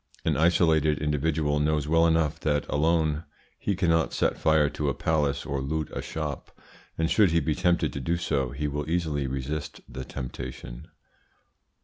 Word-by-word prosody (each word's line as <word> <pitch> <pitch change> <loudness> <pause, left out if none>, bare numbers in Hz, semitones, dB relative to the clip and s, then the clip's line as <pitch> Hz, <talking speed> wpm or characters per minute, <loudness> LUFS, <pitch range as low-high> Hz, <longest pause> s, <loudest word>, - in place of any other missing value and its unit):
An - - +2
isolated 80 -2 +3
individual 75 0 0
knows 75 -1 +1
well 80 +1 +4
enough 80 -2 +1
that 75 -1 0
alone 80 0 +1 0.4
he 100 - -1
cannot 85 -4 +2
set - - +1
fire 80 -2 +3
to 75 0 -2
a 70 - -2
palace 75 -3 0
or 70 -2 -2
loot 75 +2 -2
a - - -3
shop, 75 -3 -5 0.5
and 80 - +1
should 100 +2 +4
he 85 +1 +3
be 80 - 0
tempted 85 -5 +1
to - - -4
do 85 +6 0
so, 70 -6 -1
he 75 +4 -3
will 75 +1 -3
easily 80 -5 0
resist 70 +3 -4
the 65 +2 -7
temptation. 65 -2 -7
75 Hz, 165 wpm, -27 LUFS, 70-80 Hz, 0.5 s, well